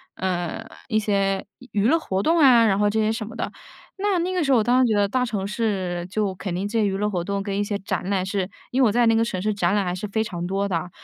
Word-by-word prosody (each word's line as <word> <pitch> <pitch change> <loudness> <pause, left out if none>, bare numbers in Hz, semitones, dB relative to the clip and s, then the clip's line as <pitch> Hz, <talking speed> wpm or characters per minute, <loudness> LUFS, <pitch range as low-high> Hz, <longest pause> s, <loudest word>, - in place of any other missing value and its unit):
呃， 185 +3 -3 0.2
一 215 -2 +2
些 195 -2 0
娱 230 -5 -3
娱 220 - +4
乐 325 - +4
活 195 -12 -2
动 330 +10 +2
啊， 250 -6 +7
然 195 -3 +2
后 205 0 +3
这 220 +2 0
些 215 0 +2
什 220 -1 -3
么 225 - -9
的。 - - -3 0.5
那 400 -1 +1
那 360 +2 -1
个 360 -2 +1
时 275 - +1
候 260 - +6
我 220 - +3
当 240 +3 +2
然 255 0 +5
觉 225 - +2
得 205 -1 +3
大 255 +5 0
e - - +2
城 205 -4 -3
市 195 -5 -2
就 200 -1 -1
肯 185 -1 -5
定 185 +3 -2
这 225 +2 -1
些 - - +2
娱 195 -1 0
乐 210 +1 0
活 180 -4 -2
动 200 +2 -2
跟 195 0 -3
一 205 - +1
些 205 0 -2
展 190 -1 -3
览 190 -2 0
是 195 -1 -2 0.2
因 260 +2 +1
为 245 - +6
我 - - +2
在 240 +3 +3
那 225 0 +4
个 225 - +3
城 210 -5 -3
市 215 +2 0
展 185 -2 +1
览 205 -2 +1
还 180 0 -2
是 185 - -5
非 220 +2 0
常 175 -5 -4
多 195 +2 -1
的， 175 -2 -2
205 Hz, 330 characters per minute, -23 LUFS, 190-230 Hz, 0.5 s, 啊